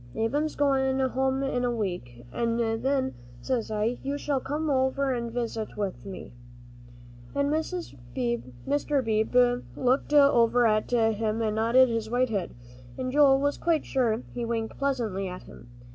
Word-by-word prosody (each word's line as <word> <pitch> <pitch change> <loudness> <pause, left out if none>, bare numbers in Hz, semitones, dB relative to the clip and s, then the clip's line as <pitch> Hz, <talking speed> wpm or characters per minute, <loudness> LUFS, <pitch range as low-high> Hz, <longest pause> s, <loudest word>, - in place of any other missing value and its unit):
"Ab'm's 290 +8 0
goin' 270 -2 +2
home 265 +1 0
in 250 -2 -1
a 245 - +1
week, 175 - -4
an' 230 -1 0
then, 260 +4 0 0.3
says 235 - -2
I, 220 +3 -1
you 280 +1 -2
shall 285 -2 -1
come 295 +4 -3
over 265 -1 +1
an' 235 -1 -3
visit 230 -3 -4
with 200 -1 -4
me." 190 -9 -8 1.0
And 280 0 +1
Mr. 130 - -2
Beebe 245 +3 +3 0.2
looked 260 +3 +1
over 245 -5 +5
at 215 -1 +2
him 225 -1 +1
and 215 -1 0
nodded 235 +4 +4
his 225 -1 -2
white 250 +1 +1
head, 200 -5 -3 0.4
and 255 0 -3
Joel 275 -1 +5
was 285 +1 0
quite 330 -3 +1
sure 240 -3 0
he 240 - -3
winked 230 -1 -3
pleasantly 230 -9 -1
at 180 0 -7
him. 120 - -14
245 Hz, 150 wpm, -27 LUFS, 220-270 Hz, 1.0 s, over